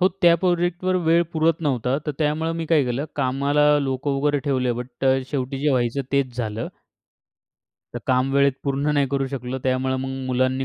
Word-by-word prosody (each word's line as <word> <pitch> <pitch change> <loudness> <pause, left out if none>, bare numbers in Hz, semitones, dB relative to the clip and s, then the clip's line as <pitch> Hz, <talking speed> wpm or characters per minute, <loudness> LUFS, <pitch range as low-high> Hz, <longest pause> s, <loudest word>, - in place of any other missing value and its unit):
हो 185 - +5
त्या 170 -1 +7
प्रोजेक्टवर 175 +1 0
वेळ 165 +1 +4
पुरत 160 +1 +1
नव्हता. 130 -3 0
तर - - 0
त्यामुळे 160 +1 0
मी 165 - -3
काय 155 -3 +3
केलं, 125 +3 -2
कामाला 140 +2 +2
लोकं 135 0 -2
वगैरे 145 0 +2
ठेवले 130 -3 +1
बट 125 +2 -7
अ, 135 0 +4
शेवटी 135 -1 -2
जे 150 - +2
व्हायचं 125 +1 0
तेच 135 -3 0
झालं. 110 -2 -3 1.3
तर - - -2
काम 130 +1 +1
वेळेत 140 0 +4
पूर्ण 140 +1 0
नाही 140 -1 +2
करू 135 -1 0
शकलो, 130 -1 -4
त्यामुळे 130 0 0
मग 135 +1 -3 0.2
मुलांनी 130 +1 0
140 Hz, 180 wpm, -23 LUFS, 130-150 Hz, 1.3 s, त्या